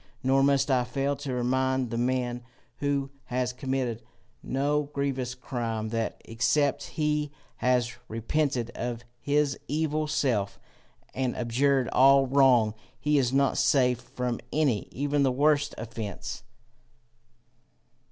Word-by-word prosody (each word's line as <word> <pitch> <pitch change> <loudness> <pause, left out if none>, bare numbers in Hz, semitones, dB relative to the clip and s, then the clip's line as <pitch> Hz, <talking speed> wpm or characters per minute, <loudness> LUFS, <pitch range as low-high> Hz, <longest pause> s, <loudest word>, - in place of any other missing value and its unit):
Nor 135 +1 +3
must 140 0 +3
I 125 -2 +3
fail 135 +3 -1
to 145 -2 -5
remind 130 0 0
the 115 - -2
man 125 -1 0 0.4
who 140 -1 -1
has 125 0 -1
committed 130 -3 -2 0.4
no 145 +2 0
grievous 135 -3 -2
crime, 115 -4 -3
that 115 0 -2
except 140 +5 +1 0.2
he 150 -1 0 0.3
has 125 -2 +1
repented 120 +1 -1
of 120 -1 -4 0.2
his 145 -1 +1
evil 155 +1 0
self, 120 -9 0 0.5
and 130 -2 -1
abjured 130 +2 +1
all 135 +1 +6
wrong, 130 -5 +4 0.3
he 150 -1 +2
is 125 -2 +1
not 140 0 +2
safe 125 -3 +3
from 125 -1 -3
any, 140 -9 +1
even 145 +2 0
the 135 -2 +3
worst 145 +2 +2
offence. 110 -3 -6
130 Hz, 125 wpm, -27 LUFS, 120-140 Hz, 0.5 s, all